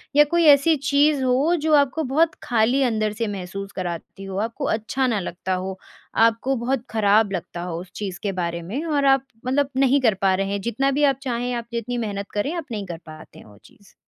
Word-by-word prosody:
या 295 - +8
कोई 340 -1 +4
ऐसी 295 +2 +6
चीज़ 280 +1 +2
हो 265 +7 +2
जो 315 0 +1
आपको 285 +2 +2
बहुत 310 +5 +2
खाली 245 +3 +2
अंदर 215 -2 0
से 230 - +1
महसूस 195 0 -6
कराती 180 +1 -5
हो 195 0 -6
आपको 275 +4 -5
अच्छा 230 +5 -1
ना 225 -4 0
लगता 185 0 -4
हो, 190 +1 -4 0.4
आपको 230 +4 +3
बहुत 245 +1 -1
खराब 210 -1 +3
लगता 175 -2 -5
हो 175 -1 -4
उस 185 - -13
चीज़ 195 -3 -5
के 200 - 0
बारे 170 0 -3
में 215 - -4
और 290 -3 +1
आप 270 -1 +4 0.2
मतलब 270 +2 +1
नहीं 270 +1 +4
कर 225 -4 +4
पा 195 -1 +3
रहे 195 +1 -1
हैं 200 0 -2
जितना 240 +6 0
भी 290 +2 0
आप 265 - -17
चाहें 245 -2 -2
आप 235 -1 -3
जितनी 235 +1 -3
मेहनत 205 -3 -4
करें 210 +10 -1
आप 335 -4 -4
नहीं 210 -3 -4
कर 175 -3 -6
पाते 155 -1 -12
हैं - - -14
वो 105 -1 -17
चीज़? 235 -7 -21
230 Hz, 220 wpm, -23 LUFS, 195-270 Hz, 0.4 s, या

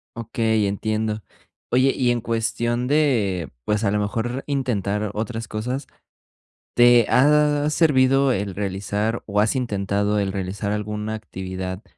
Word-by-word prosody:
Okey, 110 -2 0
entiendo. 110 +1 -2 0.5
Oye, 130 +2 +4
y 125 -2 +1
en 120 - +2
cuestión 120 +1 -1
de, 115 - +1
pues, 105 - 0
a 100 - +2
lo 105 - +1
mejor 115 +5 -2
intentar 105 -7 -1
otras 115 +1 -4
cosas, 125 +6 -4 0.9
¿te 120 -1 +6
ha 150 +2 +4
servido 135 -3 +3
el 100 -2 -2
realizar, 105 +3 -2
o 105 0 0
has 110 +4 +2
intentado 105 -3 0
el 95 -1 -1
realizar 100 +1 -3
alguna 105 +1 -3
actividad 95 -2 -6
110 Hz, 130 wpm, -22 LUFS, 100-125 Hz, 0.9 s, te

